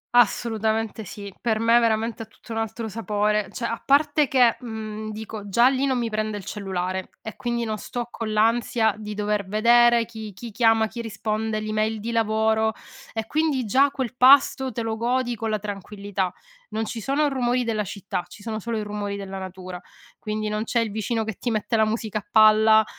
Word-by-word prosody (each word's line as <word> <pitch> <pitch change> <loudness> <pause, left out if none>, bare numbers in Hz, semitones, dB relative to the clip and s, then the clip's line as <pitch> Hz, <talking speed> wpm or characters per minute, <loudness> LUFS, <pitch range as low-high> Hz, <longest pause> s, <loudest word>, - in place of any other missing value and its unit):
Assolutamente 220 -1 +1
sì, 200 +1 -8
per 225 -2 +1
me 230 +1 +5
veramente 225 0 0
ha - - -5
tutto 230 - -15
un 225 - -2
altro 225 +1 -3
sapore, 210 -1 0
cioè, 235 - -4
a 230 0 -3
parte 290 +1 +3
che, 250 -3 +4
mhmm, 220 -2 -6
dico, 215 -1 -7
già 235 +6 +5
lì 270 +1 0
non 260 - +1
mi 235 -2 -1
prende 215 -1 -2
il 190 - -9
cellulare, 190 -2 -3
e 220 - -7
quindi, 235 -1 -2
non 215 -2 -3
sto 240 +3 -5
con 225 -2 -4
l'ansia 225 +1 +2
di 210 0 -6
dover 210 -1 -1
vedere 235 +3 +5
chi 220 -2 -8
chi 230 +4 -9
chiama, 225 0 +4
chi 235 - -6
risponde, 215 0 -2
l'email 215 0 -1
di 230 +3 -4
lavoro, 220 0 +2 0.4
e 225 -1 -3
quindi 295 -1 0
già 270 +7 +4
quel 260 -3 -4
pasto 265 0 +5
te 235 0 -3
lo 220 -1 -2
godi 245 +1 0
con 225 0 -3
la 215 - +1
tranquillità. 200 -1 -4 0.4
Non 220 0 -2
ci 225 +1 -5
sono 280 +6 +1
rumori 250 -2 +1
della 220 -3 -1
città, 195 -2 -4
ci - - -14
sono 215 0 -4
solo 230 +2 -3
i - - -1
rumori 205 -1 -4
della 195 -1 -6
natura. 185 -1 -7 0.4
Quindi, 215 0 -3
non 210 +1 -1
c'è 235 +1 0
il 225 -2 0
vicino 220 +2 -1
che 220 0 -4
ti 245 - -2
mette 220 +1 -1
la 220 -1 +4
musica 215 -1 -2
a 205 - -16
palla, 220 0 +6
220 Hz, 200 wpm, -24 LUFS, 210-235 Hz, 0.4 s, palla